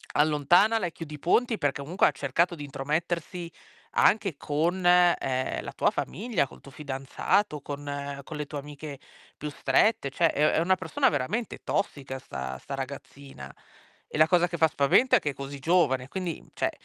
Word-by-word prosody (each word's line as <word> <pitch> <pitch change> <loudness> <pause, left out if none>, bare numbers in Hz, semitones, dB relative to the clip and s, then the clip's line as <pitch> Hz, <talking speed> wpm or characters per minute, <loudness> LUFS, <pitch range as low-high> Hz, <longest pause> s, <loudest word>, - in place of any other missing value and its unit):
allontanala 175 +8 +4
e 170 - -5
chiudi 155 -2 -8
i - - -7
ponti 225 - +2
perché 145 -1 -1
comunque 170 +7 +2
ha - - +1
cercato 145 +6 0
di 145 - -7
intromettersi 165 +5 -3 0.4
anche 200 -8 +3
con, 170 +7 -1
ehm, 175 -8 +3
la - - -7
tua - - +2
famiglia, 205 - -1
col - - -15
tuo 140 - -14
fidanzato, 145 +5 -1
con 140 0 -5
con 155 - -7
le 150 - -4
tue 145 0 -6
amiche 145 0 -8 0.4
più 150 0 -5
strette; 145 +4 +2
cioè 165 +4 +2
è 150 +1 +3
è - - +2
una 185 +3 +3
persona 165 -3 +1
veramente 150 - -2
tossica 140 -9 -2
'sta 65 - -6
'sta 140 - -7
ragazzina. 135 - -8 0.6
E - - -6
la 155 - +7
cosa 175 0 +3
che 170 - -4
fa 160 -1 +5
spavento 150 - +3
è - - +2
che 145 - -1
è - - -9
così 140 +1 -7
giovane, 140 -6 +2
quindi, 180 -3 -4
cioè, - - 0
150 Hz, 180 wpm, -27 LUFS, 140-175 Hz, 0.6 s, la